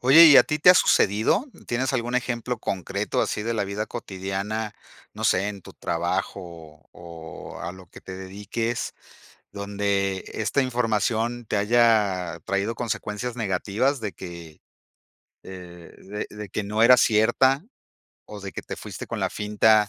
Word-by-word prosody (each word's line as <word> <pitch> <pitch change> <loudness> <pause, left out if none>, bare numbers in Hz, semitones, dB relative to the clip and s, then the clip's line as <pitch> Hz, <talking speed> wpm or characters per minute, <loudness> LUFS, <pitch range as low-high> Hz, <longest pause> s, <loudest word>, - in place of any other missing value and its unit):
Oye, 140 +7 +9
¿y 145 -3 +9
a - - +10
ti 150 - -1
te 180 - +9
ha 180 - +8
sucedido? 110 - +3 0.2
¿Tienes 125 +2 -1
algún 120 -1 -1
ejemplo 125 -1 -1
concreto 95 -4 -2
así 105 - -1
de 115 - -1
la 105 - 0
vida 100 +2 -3
cotidiana? 105 0 -4 0.4
No - - -6
sé, 95 +3 +3
en 100 -2 -6
tu - - -12
trabajo 85 +3 -2
o 80 -3 -12 0.4
o - - -9
a 85 +1 -4
lo 95 -1 -13
que - - -13
te 95 - -8
dediques, 105 +5 -4 0.6
¿dónde 100 -1 -1
esta 110 +6 0
información 120 -1 0
te 105 - -1
haya 100 -6 +2
traído 100 +4 -1
consecuencias 115 +1 -3
negativas, 110 +6 0
de 105 -4 -4
que 85 -3 -10 0.8
eh, 90 -2 -11
de 105 +2 -6
de - - -14
de 105 -1 -6
que 105 - -3
no 105 +2 -1
era 125 +2 +9
cierta 120 +7 +3 0.6
o 105 -1 -9
de 100 0 -6
que - - -6
te - - -7
fuiste - - -8
con - - -4
la - - +1
finta 105 0 +3
105 Hz, 165 wpm, -25 LUFS, 95-120 Hz, 0.8 s, a